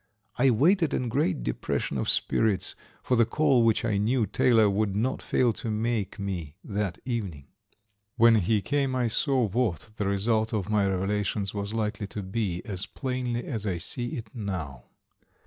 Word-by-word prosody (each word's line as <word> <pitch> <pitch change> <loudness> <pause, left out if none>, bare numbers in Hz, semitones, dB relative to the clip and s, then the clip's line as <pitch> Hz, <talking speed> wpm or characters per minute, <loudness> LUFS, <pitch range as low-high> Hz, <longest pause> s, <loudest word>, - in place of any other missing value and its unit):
I 135 +2 +4
waited 165 - +3
in 125 - -1
great 110 - 0
depression - - -2
of - - -1
spirits 105 -4 +1 0.3
for 125 - +1
the 120 - +5
call 130 -2 +3
which 115 0 +2
I 105 -3 +1
knew 115 +3 +2
Taylor 110 +2 +4
would 100 0 0
not 120 +5 -1
fail 120 -3 +2
to 115 - -5
make 110 -2 -1
me 90 -7 -4
that 100 -4 -2
evening. 100 - -4 0.7
When 115 -1 +6
he 105 +1 +1
came 140 -3 0
I 125 -2 +1
saw 130 +3 +1
what 110 - -1
the 105 - -1
result 110 +3 +1
of 105 -1 -2
my 105 -2 +3
revelations 100 +1 -1
was 100 +1 -4
likely 105 -2 -2
to 105 +1 -6
be 95 -3 -2
as 95 -3 -4
plainly 125 -3 -3
as 110 -5 -3
I 90 -3 -1
see 120 - 0
it 110 -3 -8
now. 90 - -5
110 Hz, 170 wpm, -27 LUFS, 100-120 Hz, 0.7 s, When